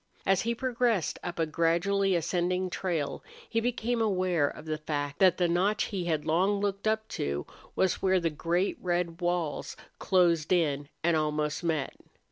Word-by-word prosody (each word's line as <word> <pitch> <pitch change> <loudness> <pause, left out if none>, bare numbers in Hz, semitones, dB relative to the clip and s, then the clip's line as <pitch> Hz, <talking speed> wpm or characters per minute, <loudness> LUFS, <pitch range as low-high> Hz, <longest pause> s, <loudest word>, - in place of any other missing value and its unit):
As 190 -1 +3
he 235 +1 -1
progressed 240 - 0
up 175 -1 -5
a 165 - +2
gradually 175 +5 +1
ascending 180 +2 0
trail 170 -7 -2 0.2
he 230 - 0
became 240 0 -1
aware 185 -7 +2
of 150 - -8
the 155 -1 -3
fact 145 -2 -3
that 185 -2 +5
the 180 - +2
notch 185 +5 +2
he 190 -4 -3
had 155 -3 -1
long 185 +6 +2
looked 200 +1 -2
up 220 0 0
to 70 0 -3 0.3
was 190 - +1
where 190 -1 +3
the 165 -2 0
great 170 +5 0
red 175 -1 -1
walls 175 -3 -2 0.2
closed 170 -4 +2
in 145 -5 +1
and 170 0 +3
almost 150 0 -1
met. 160 -5 -1
175 Hz, 165 wpm, -29 LUFS, 160-195 Hz, 0.3 s, that